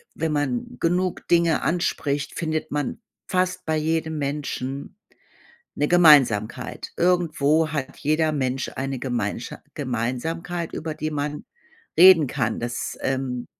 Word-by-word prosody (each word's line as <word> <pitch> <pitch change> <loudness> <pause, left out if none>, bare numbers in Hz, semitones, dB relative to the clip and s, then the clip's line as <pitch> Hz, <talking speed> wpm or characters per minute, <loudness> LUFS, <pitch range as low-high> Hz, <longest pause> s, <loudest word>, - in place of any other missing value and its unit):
wenn 160 -1 -1
man 130 -4 -2
genug 180 +2 0
Dinge 170 -2 +3
anspricht, 145 -4 -1
findet 155 -1 -2
man 145 +5 -2 0.3
fast 180 -1 0
bei 160 - 0
jedem 160 0 -1
Menschen 140 -1 -4 0.8
'ne 145 - +1
Gemeinsamkeit. 130 -9 +4
Irgendwo 160 -3 +2
hat 140 -4 -3
jeder 155 +1 +1
Mensch 130 -2 -1
eine 135 0 -3
Gemeinscha 120 -3 -3
Gemeinsamkeit, 150 +7 -3
über 155 -1 -4
die 155 +1 -3
man 150 0 -3 0.5
reden 175 -4 +8
kann. 110 -3 -1
Das, 120 0 -4
ähm 130 -2 -2
150 Hz, 120 wpm, -24 LUFS, 130-165 Hz, 0.8 s, reden